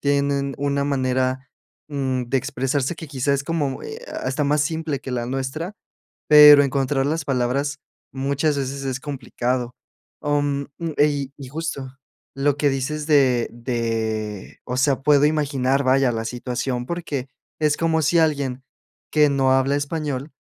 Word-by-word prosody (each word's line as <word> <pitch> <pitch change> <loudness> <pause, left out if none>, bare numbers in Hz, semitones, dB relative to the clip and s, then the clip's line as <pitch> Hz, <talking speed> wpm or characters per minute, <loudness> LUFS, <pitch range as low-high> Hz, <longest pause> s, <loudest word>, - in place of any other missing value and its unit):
Tienen 140 -1 0
una 140 0 0
manera, 130 -1 0 0.4
mm, 130 -3 -1
de 135 - 0
expresarse 135 +4 -1
que 160 - -9
quizás 140 0 0
es 140 - -3
como, 150 -4 -2
eh, 450 +3 -8 0.2
hasta 135 +3 -1
más 145 +1 +2
simple 160 -2 -1
que 135 - -7
la 120 -1 -1
nuestra, 135 - -3 0.6
pero 150 -1 +10
encontrar 135 0 0
las 155 0 -1
palabras 140 +2 -1 0.3
muchas 140 +2 0
veces 135 0 -3
es 130 -1 -3
complicado, 125 -2 -3 0.5
om, 145 -1 0 0.3
y 145 -2 +2
y 135 -3 -9
justo 140 -3 -5 0.4
lo 140 +1 +1
que 145 0 +3
dices 145 +3 -2
de 130 -6 +3
de, 115 -4 -3
o 125 - -4
sea, 135 0 +2
puedo 145 0 +5
imaginar, 140 -3 +1
vaya, 130 -1 +3
la 115 0 -3
situación 125 +1 -3
porque 150 -6 -4 0.3
es 150 -1 +2
como 165 -1 +2
si 170 +3 +3
alguien 140 -5 0 0.5
que 150 -1 +5
no 135 -1 +2
habla 135 +1 +2
español 145 -1 -3
140 Hz, 145 wpm, -22 LUFS, 130-145 Hz, 0.6 s, pero